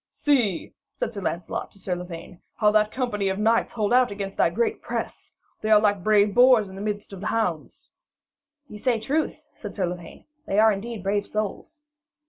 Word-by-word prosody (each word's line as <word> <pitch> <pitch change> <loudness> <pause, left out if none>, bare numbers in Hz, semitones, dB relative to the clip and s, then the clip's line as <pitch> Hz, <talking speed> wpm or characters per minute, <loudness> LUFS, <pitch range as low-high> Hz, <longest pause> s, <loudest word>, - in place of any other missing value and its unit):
'See,' 240 - 0 0.2
said - - -3
Sir 200 - -5
Lancelot 170 -1 -3
to - - -15
Sir 185 -1 -3
Lavaine, 175 0 -9
'how 210 -1 +3
that 215 0 +3
company 210 -7 -1
of 190 - -2
knights 225 +2 +2
hold 215 0 0
out 250 0 +5
against 200 -1 -5
that - - +3
great 450 -2 0
press! - - -5 0.3
They 215 - -2
are 215 -1 +7
like 205 -3 +1
brave 210 -1 +4
boars 245 -3 +6
in 190 - -11
the 195 - -7
midst 205 -1 -4
of 190 - -8
the 210 - -3
hounds.' 180 -9 -2 0.8
'Ye 210 - -10
say 240 0 +1
truth,' 290 +8 -2
said - - -9
Sir 190 - 0
Lavaine; 175 -1 -8 0.2
'they 195 - -1
are 220 +1 +6
indeed 215 0 -5
brave 200 +1 0
souls.' 215 +9 -4
210 Hz, 195 wpm, -25 LUFS, 195-225 Hz, 0.8 s, are